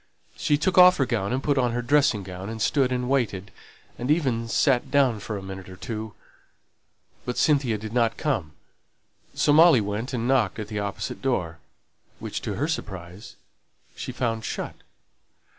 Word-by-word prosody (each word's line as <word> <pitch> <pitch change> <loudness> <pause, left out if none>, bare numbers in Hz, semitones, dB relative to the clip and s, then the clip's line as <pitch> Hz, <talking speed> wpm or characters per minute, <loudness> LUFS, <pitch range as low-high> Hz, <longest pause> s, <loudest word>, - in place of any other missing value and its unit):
She 145 - +1
took 185 +5 +2
off 180 0 +8
her 135 - +2
gown 115 -5 -1
and 130 +2 -1
put 145 -2 +1
on 120 -2 +1
her 120 0 -2
dressing 135 -5 +2
gown, 95 +2 -7
and 115 0 -6
stood 130 +3 +2
and 125 -1 -1
waited, 110 -8 -1 0.5
and 125 +3 -3
even 130 -8 +1
sat 130 +2 +2
down 130 -5 +3
for 105 +1 -5
a 95 - -8
minute 95 -1 -8
or 95 - -10
two: 110 +2 -6 1.1
but 125 - -4
Cynthia 135 -7 +2
did 110 +1 -7
not 115 -2 +1
come, 110 - -2 0.8
so 145 - +3
Molly 160 -3 +7
went 105 +5 -3
and 120 -2 -2
knocked 135 -3 +2
at 110 -1 -6
the 105 -2 -3
opposite 100 +1 -4
door, 90 -12 -1 0.6
which, - - -5
to - - -4
her 145 +5 -1
surprise, 95 - -6 0.6
she - - -5
found 115 -3 -2
shut. - - -4
120 Hz, 175 wpm, -25 LUFS, 105-135 Hz, 1.1 s, off